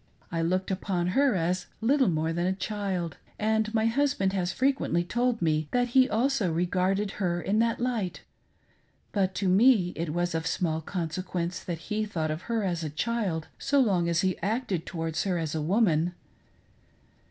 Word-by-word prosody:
I 165 -1 -1
looked 185 +3 0
upon 180 -2 -1
her 270 +3 +3
as 180 +1 -1
little 265 +3 +3
more 160 0 0
than 175 +2 0
a 190 - +2
child, 190 -4 -3 0.2
and 220 0 +1
my 220 -1 +1
husband 230 -6 +1
has 185 -2 0
frequently 260 -10 +1
told 240 +3 0
me 155 -1 +1
that 245 0 +2
he 260 +2 +5
also 235 -5 +1
regarded 185 +4 0
her 175 -2 +1
in 200 +5 0
that 230 0 +1
light, 235 -7 -2 0.9
but 190 -2 0
to 195 - 0
me 195 -1 +5
it 165 0 -3
was 175 +1 -1
of 160 +1 -1
small 160 -3 0
consequence 175 +1 -3
that 170 -2 -3 0.2
he 215 0 +1
thought 165 -7 -2
of 155 +2 -4
her 230 -2 0
as 175 -4 -1
a 155 - -2
child, 180 -1 -2
so 285 0 +2
long 185 -9 +2
as 170 0 +2
he 185 -2 0
acted 205 -3 -2
towards 165 -2 -2
her 185 -3 0
as 160 -3 -2
a 160 - -1
woman. 175 -1 +2
185 Hz, 175 wpm, -28 LUFS, 170-220 Hz, 0.9 s, he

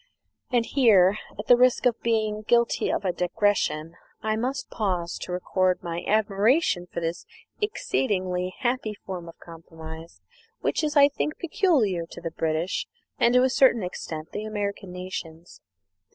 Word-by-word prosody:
And 240 -2 +2
here, 210 -8 +4 0.2
at 210 - -5
the 245 - +7
risk 250 +1 +3
of 240 -2 +2
being 215 -2 0
guilty 235 +2 +2
of - - -2
a 185 - +2
digression, 180 -3 0 0.3
I 215 0 +1
must 255 +5 -3
pause 180 -5 -2
to - - -6
record 185 +1 0
my 170 0 -4
admiration 215 - +2
for - - -3
this 165 +1 -3 0.4
exceedingly 185 - -1
happy 240 -4 -1
form 180 -4 -7
of - - -13
compromise, 165 0 -11 0.4
which - - 0
is, 300 -1 0
I 285 0 +8
think, 295 +2 -3
peculiar 295 - +1
to - - -10
the 165 -1 -5
British 160 +2 -1 0.3
and, 235 +1 +4
to 250 - +6
a 260 - +3
certain 245 -5 +4
extent, 160 -3 -6
the 210 - -4
American 205 -3 -4
nations. 180 -2 -8
200 Hz, 150 wpm, -25 LUFS, 175-240 Hz, 0.4 s, I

